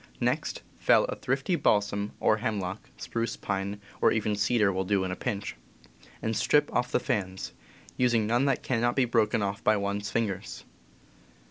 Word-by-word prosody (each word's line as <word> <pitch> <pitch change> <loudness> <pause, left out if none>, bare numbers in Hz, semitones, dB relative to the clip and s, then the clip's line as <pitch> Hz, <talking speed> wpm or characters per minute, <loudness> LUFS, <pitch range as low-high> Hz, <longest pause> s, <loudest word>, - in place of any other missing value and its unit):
Next - - -1 0.2
fell - - +5
a - - -4
thrifty 135 +7 0
balsam 105 -6 +1
or 110 - +3
hem 110 -2 -1
lock 95 +2 -5
(spruce, 115 -1 -3
pine, 100 +1 -3 0.2
or - - +5
even 105 -1 0
cedar 105 -1 +2
will 95 +1 0
do 95 0 +1
in 95 - -2
a - - -2
pinch) 100 +1 -3 0.7
and 110 0 0
strip 145 +7 +2
off 125 0 0
the - - +3
fans, 95 -2 -2 0.5
using 120 -3 +3
none 120 +5 +2
that 135 -2 +1
cannot 120 -1 +1
be 135 - +3
broken 110 -3 +2
off 100 +2 -3
by 110 -1 +4
one's 100 0 -2
fingers. 105 -3 -3
105 Hz, 170 wpm, -28 LUFS, 100-120 Hz, 0.7 s, fell